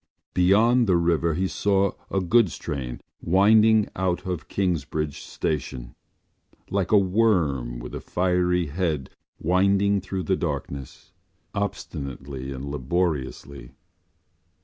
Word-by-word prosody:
Beyond 110 +7 +4
the 90 -2 +4
river 85 -1 +1
he 95 +3 0
saw 100 0 +1 0.2
a 95 - 0
goods 100 +1 +3
train 60 -4 -5 0.2
winding 105 +4 +5
out 95 0 -1
of 90 -3 -4
Kingsbridge 80 -5 -2
Station, 65 -5 -4 0.8
like 100 -1 0
a 105 - +7
worm 90 - +1
with - - -8
a - - -5
fiery 90 -1 +1
head 75 -3 -2 0.3
winding 100 +3 +2
through 95 0 -4
the 95 - +1
darkness, 70 -5 -5 0.4
obstinately 70 - -5
and 65 0 -6
laboriously. 70 -2 -3
90 Hz, 110 wpm, -25 LUFS, 70-100 Hz, 0.8 s, a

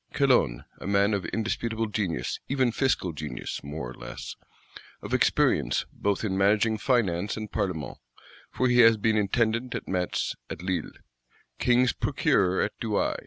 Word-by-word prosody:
Calonne, 125 - +2
a - - -7
man 100 +1 +3
of 100 -2 -1
indisputable 115 0 -2
genius; 100 - -2
even 130 -3 +1
fiscal 115 - 0
genius, 75 -4 -5
more 70 -2 -5
or - - -9
less; - - -8 0.7
of - - -5
experience - - +2
both 100 0 -1
in 95 -3 -1
managing 105 +3 +2
Finance 100 -6 +1
and 110 -1 -6
Parlements, 90 -6 -3 0.5
for 130 - 0
he 125 0 +3
has 115 -2 +7
been 110 +1 +1
Intendant 115 +4 0
at 115 - -5
Metz, 90 -1 -1
at - - -7
Lille; 90 -4 -2 0.7
King's 125 0 +3
Procureur 95 -1 +1
at - - 0
Douai. 110 -3 0
105 Hz, 150 wpm, -27 LUFS, 95-115 Hz, 0.7 s, has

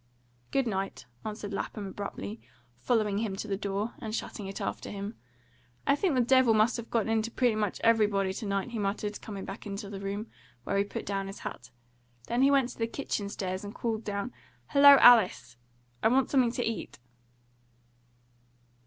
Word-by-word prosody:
"Good 270 -1 +1
night," 195 -3 -3 0.2
answered 210 -1 -5
Lapham 205 +1 -4
abruptly, 115 - -6 0.4
following 210 - +1
him 215 -3 -2
to 205 - -5
the 200 - -1
door, 200 +3 -3
and 220 -3 -4
shutting 205 -3 -5
it 195 - -6
after - - -4
him. 200 +1 -5 0.7
"I 280 - +4
think 330 -1 +1
the 255 - +4
devil 245 -2 +5
must 215 +3 +3
have 235 -1 -7
got 225 -2 +1
into 225 0 +1
pretty 245 0 +2
much 210 -3 -1
everybody 205 -4 +3
to 210 - -5
night," 200 +3 -1
he 230 - -3
muttered, 205 +1 -2
coming 200 -3 -6
back 195 - -7
to 200 0 -6
the 195 - -6
room, 200 +2 -3 0.4
where 200 +9 0
he 200 - +2
put - - -6
down 195 -1 -2
his 195 - -8
hat. 115 -1 -7 0.6
Then 240 +2 0
he 275 - +6
went 275 -3 +3
to 245 - -11
the 225 - +1
kitchen 220 -5 -3
stairs 185 -2 -4
and 205 +2 -8
called 225 -2 -2
down, 205 +4 -3 0.4
"Hello, 280 -1 +9
Alice! 180 - +6 0.5
I - - +4
want 255 +3 +2
something 255 -4 +4
to 245 - -1
eat!" 225 -3 -4
210 Hz, 185 wpm, -29 LUFS, 195-235 Hz, 0.7 s, Hello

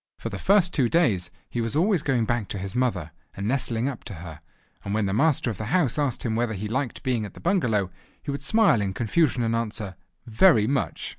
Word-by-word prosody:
For - - -5
the - - -6
first 195 -3 +3
two 130 -6 +2
days 110 - +2 0.2
he 120 - -3
was 115 +3 -2
always 180 +1 +2
going 130 -6 +1
back 120 -3 -1
to - - -5
his 95 0 -5
mother, 105 -11 -1 0.3
and 100 +1 -3
nestling 125 -1 0
up 135 -5 -5
to 105 -4 -7
her: 80 -2 -9 0.4
and 100 - -3
when 110 -1 +1
the 95 - -1
master 135 0 +2
of 100 - -9
the 110 - -3
house 145 - +1
asked 140 -5 0
him 110 -2 -1
whether 115 -1 0
he 105 +3 -4
liked 130 +3 -3
being 125 -4 0
at 105 - -8
the - - -11
bungalow, 115 - +1 0.3
he - - -5
would 140 - -4
smile 215 - +3
in 95 -2 -2
confusion 125 +2 +1
and 115 0 0
answer: 110 -4 -3 0.3
"Very 115 - +4
much!" 135 +4 -2
115 Hz, 230 wpm, -25 LUFS, 105-140 Hz, 0.4 s, Very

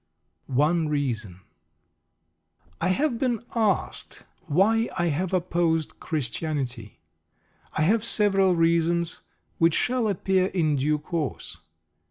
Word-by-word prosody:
ONE 155 +4 +1
REASON 115 -11 -2 1.4
I - - +1
have 235 +6 +1
been 240 -4 0
asked 215 -6 -1 0.2
why 220 +9 +2
I 175 -1 +1
have 180 +4 -2
opposed 170 -3 0
Christianity. 135 -5 -4 0.7
I 155 - 0
have 215 +6 +2
several 195 -5 +3
reasons, 170 0 +1 0.4
which 165 -1 +4
shall 250 -2 +1
appear 190 -1 +1
in 155 -6 0
due 150 +3 +1
course. 155 -1 -4
170 Hz, 105 wpm, -25 LUFS, 150-195 Hz, 1.4 s, which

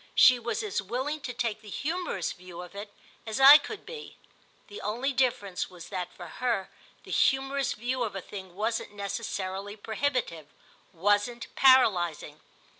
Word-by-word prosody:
She 255 -1 +7
was 235 - -2
as 410 - -1
willing 260 +9 -3
to 260 - -4
take 230 -3 -2
the 215 - -12
humorous 320 - -2
view 180 -1 -10
of 180 - -12
it 205 +1 -8 0.4
as 220 +2 -2
I 280 +3 +11
could 400 +8 -8
be: 465 -2 -9 0.5
the 410 - -10
only 245 +6 -1
difference 240 -8 0
was 180 -3 -11
that 180 -2 -4
for - - -10
her 235 -6 -2 0.3
the - - -11
humorous 270 0 +2
view 250 +1 -3
of 220 -4 -2
a - - -2
thing 190 -3 -9
wasn't 220 +1 -2
necessarily 200 -1 -4
prohibitive, 220 - -2 0.4
wasn't 205 +6 0
paralysing. 175 - +4
220 Hz, 155 wpm, -28 LUFS, 195-265 Hz, 0.5 s, I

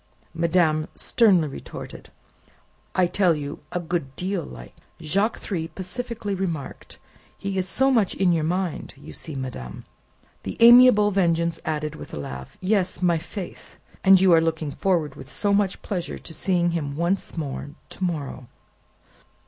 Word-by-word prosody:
Madame 165 -2 +2
sternly 190 -9 +3
retorted, 135 - -9 0.9
"I 185 - +4
tell 175 -1 +2
you 145 -1 -5
a 180 - -1
good 165 -6 -3
deal 185 0 -2
like." - - -10 0.3
Jacques 195 +8 0
Three 165 -5 -3
pacifically 205 +4 -5
remarked, 175 -7 -5 0.4
"He 195 0 -4
is 185 -1 0
so 265 +5 +3
much 225 -7 +2
in 185 -2 +3
your 160 -2 +1
mind, 180 0 -2 0.2
see 160 - -6
you, - - -5
madame." 115 - -6 0.6
The - - -6
amiable 235 -3 +8
Vengeance 170 -3 +1
added, 150 -1 -2
with - - -9
a - - -5
laugh, 65 -2 -8
"Yes, 185 -2 0
my 170 -2 +3
faith! 180 +3 -8 0.3
And 190 0 +7
you 185 -2 +5
are 165 - +6
looking 160 -2 -1
forward 165 -4 0
with 135 - -12
so 205 -1 0
much 200 -2 +1
pleasure 180 -5 -3
to 160 - -11
seeing 175 -1 +1
him 145 -4 -3
once 170 +3 -1
more 145 -2 -4 0.2
to - - -7
morrow!" 145 -7 -3
175 Hz, 155 wpm, -24 LUFS, 155-195 Hz, 0.9 s, amiable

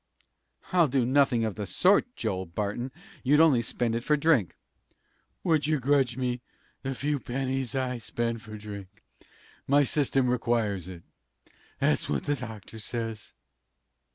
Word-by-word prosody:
"I'll 175 -3 +5
do 130 -2 +1
nothing 130 -3 +3
of 110 - -2
the 105 -1 -5
sort, 200 - +3
Joel 95 -1 -2
Barton! 105 +8 -3 0.3
You'd 145 +3 +4
only 155 -7 +6
spend 115 0 -1
it 115 0 -2
for 150 +2 +3
drink." 140 - +2 0.9
"Would 155 -4 +2
you 155 -2 +2
grudge 135 -2 +2
me 125 -1 -1 0.4
the 135 0 -3
few 145 +2 -1
pennies 130 0 -2
I 130 -2 -1
spend 115 0 -2
for 110 -1 -9
drink? 100 -3 -9 0.6
My 145 +1 +5
system 135 -1 +2
requires 115 -7 0
it. 90 -3 -9 0.7
That's - - +1
what 70 - 0
the 145 - +1
doctor 110 -3 -8
says." 115 -1 -5
125 Hz, 145 wpm, -28 LUFS, 110-140 Hz, 0.9 s, only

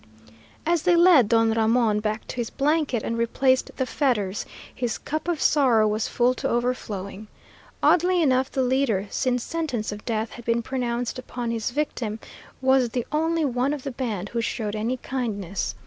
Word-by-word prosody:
As 340 0 +2
they 355 +1 +4
led 340 - +6
Don 225 -1 +3
Ramon 225 -1 +2
back 215 0 -3
to - - -6
his 235 -2 -2
blanket 285 -5 0
and 230 0 -2
replaced 260 +3 +2
the 260 - 0
fetters, 215 -9 -1 0.3
his 245 -3 -2
cup 310 +3 -4
of 345 -3 0
sorrow 250 -9 +4
was 215 +1 0
full 245 +1 +2
to - - -3
overflowing. 215 -4 -3 0.6
Oddly 360 +1 +4
enough 265 -4 +2
the 265 - 0
leader, 250 -6 +1
since 250 -2 0
sentence 295 -11 -3
of 210 0 -8
death 220 -1 -2
had 235 - -11
been 235 0 +1
pronounced 245 -1 -2
upon 245 -2 -4
his 225 0 -2
victim, 240 -5 -3 0.4
was 260 -2 +4
the 240 0 -2
only 320 +1 +1
one 255 +1 0
of 285 -3 -5
the 275 - -4
band 220 -7 -3
who 235 - -2
showed 220 -2 -3
any 230 +4 -1
kindness. 210 -8 -3
245 Hz, 175 wpm, -24 LUFS, 220-270 Hz, 0.6 s, led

